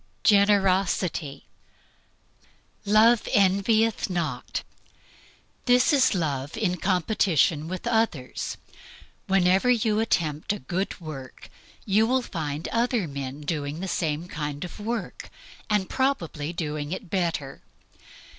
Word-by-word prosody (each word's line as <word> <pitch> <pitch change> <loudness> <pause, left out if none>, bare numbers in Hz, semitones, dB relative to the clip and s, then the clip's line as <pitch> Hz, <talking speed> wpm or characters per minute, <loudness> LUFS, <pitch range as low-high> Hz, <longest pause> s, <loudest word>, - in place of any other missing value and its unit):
Generosity. 190 -7 +2 1.4
"Love 215 +3 +5
envieth 205 +3 +3
not." 155 -9 -3 1.0
This 250 +5 +4
is 260 -6 +4
love 145 -3 -2
in 185 -5 0
competition 180 -4 +1
with 185 +1 -5
others. 220 - -1 0.7
Whenever 190 +4 +3
you 220 -3 +2
attempt 160 -6 0
a - - -4
good 180 +11 -3
work 140 -6 -9 0.3
you 210 +3 +3
will 255 +1 +1
find 155 -6 -4
other 235 -5 0
men 140 0 -6
doing 145 0 -3
the 190 - -4
same 165 -2 -2
kind 150 -1 -4
of 180 - -10
work, 225 +2 -4 0.4
and 205 -3 +1
probably 170 - -1
doing 150 -3 -4
it 185 -1 -6
better. 165 -7 -2
180 Hz, 110 wpm, -26 LUFS, 150-215 Hz, 1.4 s, Love